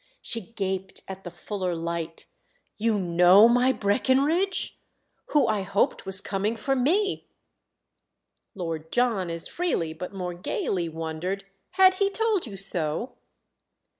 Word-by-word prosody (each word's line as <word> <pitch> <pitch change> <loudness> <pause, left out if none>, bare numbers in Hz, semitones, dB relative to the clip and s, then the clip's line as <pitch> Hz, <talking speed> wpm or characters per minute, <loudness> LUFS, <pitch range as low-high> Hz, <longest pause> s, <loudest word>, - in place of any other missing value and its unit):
She 230 - -1
gaped 190 -2 -3
at 190 0 -8
the 175 - -6
fuller 180 +1 -4
light 165 0 -4 0.5
"You 220 0 +2
know 180 +3 +6
my 245 +2 +4
Breckenridge?—who 285 - 0
I 215 -2 +1
hoped 195 0 0
was 190 0 0
coming 200 +3 -1
for 270 +4 -1
me!" 365 +11 +1 1.3
Lord 165 -4 -5
John 230 -8 +1
as 165 0 0
freely, 245 - -1
but 180 +3 -7
more 180 -3 -4
gaily, 175 0 -2
wondered. 165 +5 -4 0.3
"Had 375 0 +6
he 395 - +4
told 430 - 0
you 200 -3 -8
so?" 180 +2 -1
195 Hz, 125 wpm, -26 LUFS, 175-250 Hz, 1.3 s, know